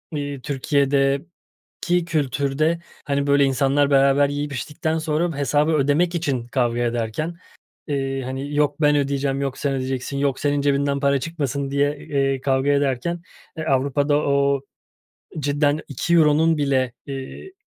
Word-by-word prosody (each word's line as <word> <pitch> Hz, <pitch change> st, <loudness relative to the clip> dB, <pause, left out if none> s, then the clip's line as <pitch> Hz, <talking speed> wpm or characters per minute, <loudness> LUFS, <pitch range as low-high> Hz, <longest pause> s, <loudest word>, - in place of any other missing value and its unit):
iii, 145 Hz, -2 st, -4 dB
Türkiye'deki 140 Hz, +5 st, -1 dB
kültürde, 150 Hz, +1 st, 0 dB, 0.3 s
hani, 140 Hz, 0 st, -1 dB
böyle, 140 Hz, 0 st, +4 dB
insanlar 140 Hz, +2 st, +2 dB
beraber 140 Hz, +1 st, +4 dB
yiyip 145 Hz, 0 st, -3 dB
içtikten 155 Hz, +4 st, -2 dB
sonra 160 Hz, 0 st, -1 dB
hesabı 145 Hz, +2 st, +2 dB
ödemek 155 Hz, +4 st, +2 dB
için 135 Hz, -8 st, -2 dB
kavga 120 Hz, -1 st, 0 dB
ederken, 120 Hz, +8 st, -2 dB, 0.5 s
eee, 135 Hz, -2 st, -2 dB
hani, 135 Hz, +3 st, -5 dB
yok, 145 Hz, +1 st, +1 dB
"Ben 150 Hz, 0 st, +4 dB
ödeyeceğim!" 140 Hz, -1 st, -1 dB
yok, 135 Hz, -2 st, -3 dB
"Sen 140 Hz, -1 st, -1 dB
ödeyeceksin.", 130 Hz, +1 st, -3 dB
yok 140 Hz, -1 st, 0 dB
"Senin 145 Hz, -1 st, +1 dB
cebinden 140 Hz, 0 st, +1 dB
para 140 Hz, -1 st, +2 dB
çıkmasın." 140 Hz, -3 st, -3 dB
diye, 145 Hz, +1 st, +1 dB
eee, 135 Hz, -2 st, -1 dB
kavga 135 Hz, 0 st, +1 dB
ederken, 140 Hz, +4 st, 0 dB, 0.4 s
eee, 160 Hz, -, -4 dB
Avrupa'da 140 Hz, +1 st, +1 dB
o, 140 Hz, -1 st, +1 dB, 0.8 s
cidden 145 Hz, +1 st, +1 dB
2 150 Hz, +5 st, -2 dB
euronun 160 Hz, 0 st, +4 dB
bile, 130 Hz, -4 st, +1 dB
eee, 135 Hz, -, -8 dB
140 Hz, 135 wpm, -22 LUFS, 135-150 Hz, 0.8 s, böyle